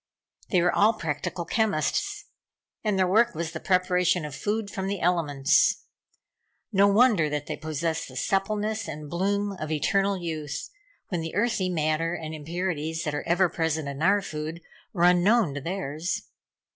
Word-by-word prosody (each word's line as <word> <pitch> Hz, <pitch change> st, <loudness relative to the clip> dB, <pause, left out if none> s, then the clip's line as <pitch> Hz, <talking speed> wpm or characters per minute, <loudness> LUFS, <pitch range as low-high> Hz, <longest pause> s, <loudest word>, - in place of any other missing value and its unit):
They 180 Hz, -4 st, +3 dB
were 175 Hz, -, +3 dB
all 215 Hz, +3 st, +4 dB
practical 170 Hz, 0 st, -3 dB
chemists, 235 Hz, -, 0 dB, 0.6 s
and 210 Hz, -3 st, +1 dB
their 185 Hz, -1 st, +3 dB
work 225 Hz, +4 st, +3 dB
was 165 Hz, 0 st, -3 dB
the 160 Hz, -, -5 dB
preparation 180 Hz, -2 st, +2 dB
of 150 Hz, -, -6 dB
food 205 Hz, +8 st, -2 dB
from 190 Hz, 0 st, -3 dB
the 200 Hz, -1 st, -2 dB
elements. 155 Hz, -5 st, +2 dB, 0.9 s
No 200 Hz, -1 st, +5 dB
wonder 205 Hz, -6 st, +4 dB
that 150 Hz, 0 st, -3 dB
they -, -, -4 dB
possessed 160 Hz, +1 st, -3 dB
the 130 Hz, -, -12 dB
suppleness 210 Hz, -, -1 dB
and 150 Hz, -1 st, -7 dB
bloom 200 Hz, +3 st, 0 dB
of 155 Hz, -, -4 dB
eternal 195 Hz, +6 st, +1 dB
youth, 155 Hz, -4 st, -5 dB, 0.4 s
when 175 Hz, -4 st, -2 dB
the 165 Hz, 0 st, -5 dB
earthy 205 Hz, -3 st, +1 dB
matter 165 Hz, 0 st, 0 dB
and 160 Hz, -2 st, -6 dB
impurities 160 Hz, 0 st, -3 dB
that 150 Hz, -, -2 dB
are 145 Hz, -, -2 dB
ever 175 Hz, +2 st, +4 dB
present 160 Hz, -2 st, -1 dB
in 140 Hz, +1 st, -5 dB
our 200 Hz, +4 st, +3 dB
food, 155 Hz, 0 st, -5 dB, 0.3 s
were 175 Hz, -4 st, -1 dB
unknown 180 Hz, 0 st, +4 dB
to 145 Hz, -, -5 dB
theirs. 165 Hz, 0 st, -3 dB
175 Hz, 160 wpm, -26 LUFS, 155-200 Hz, 0.9 s, No